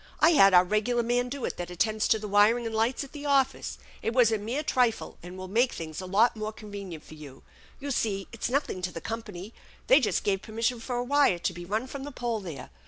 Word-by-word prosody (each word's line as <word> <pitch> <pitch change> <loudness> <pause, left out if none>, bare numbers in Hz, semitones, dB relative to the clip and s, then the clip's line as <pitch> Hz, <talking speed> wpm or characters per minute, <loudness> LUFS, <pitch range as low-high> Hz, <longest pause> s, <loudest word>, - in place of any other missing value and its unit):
I 320 - +6
had 195 - +6
our 180 - +8
regular 215 +5 +1
man 245 +1 0
do 275 0 -4
it - - -4
that 175 0 -5
attends 215 +4 0
to 220 - +4
the 215 0 -6
wiring 210 +4 +4
and 225 - -3
lights 225 +5 +1
at 275 - -11
the 290 -1 -6
office. 275 -2 +1 0.2
It 225 - -1
was 240 -3 +5
a 220 - +1
mere 240 +9 -3
trifle, 245 -6 0
and 180 +2 -9
will 185 0 -7
make 235 +6 +2
things 160 +1 -6
a 185 - -7
lot 215 +6 +3
more 215 0 -4
con 215 -1 -12
venient 190 -6 -7
for - - -13
you. 145 -4 -12 0.4
You 285 +1 -4
see 200 -6 -1
it's 230 - -3
nothing 260 -8 -1
to 180 0 -2
the 165 - -6
company. 210 -1 -6 0.3
They 265 - +6
just 245 - 0
gave 195 -2 0
permission 230 +3 -2
for 245 +2 -4
a 245 - 0
wire 280 -7 +3
to 180 +2 -2
be 175 0 -8
run 215 +6 -1
from 270 +1 -7
the 290 - -6
pole 240 -3 -2
there. 165 -10 -8
220 Hz, 250 wpm, -28 LUFS, 190-245 Hz, 0.4 s, our